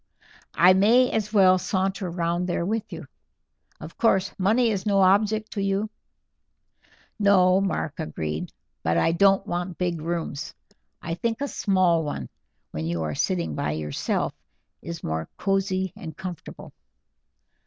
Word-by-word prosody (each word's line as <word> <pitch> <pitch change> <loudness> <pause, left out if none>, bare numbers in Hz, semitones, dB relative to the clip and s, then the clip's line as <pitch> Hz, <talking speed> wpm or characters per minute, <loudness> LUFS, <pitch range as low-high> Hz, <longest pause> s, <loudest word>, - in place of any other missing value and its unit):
I 180 +4 +7
may 230 +7 +4
as 210 -1 -1
well 185 -3 +5
saunter 190 0 -1
round 170 +1 -1
there 170 -1 -1
with 220 +3 -2
you. - - -7 0.7
Of - - -11
course 195 -4 +2
money 225 +5 +3
is 195 -3 -2
no 200 -2 +2
object 210 +3 +3
to 200 - -3
you?" 195 +2 -1 1.3
"No," 190 -2 +4
Mark 180 -6 -2
agreed, 80 - -4 0.3
"but 80 +1 +1
I 85 - +3
don't 195 +3 +3
want 175 -2 -3
big 175 -3 -2
rooms. 160 -3 -4 0.5
I 165 - -3
think 225 +6 -2
a 285 - -1
small 185 -8 +2
one, 105 - -5 0.4
when 80 +1 -4
you 85 -1 -2
are 75 -1 -2
sitting 85 +2 -1
by 75 0 -2
yourself, 75 -2 -2 0.5
is 170 -1 -7
more 80 0 -3
cozy 190 -1 0
and 165 -7 -9
comfortable." 185 -4 -8
185 Hz, 145 wpm, -25 LUFS, 165-200 Hz, 1.3 s, I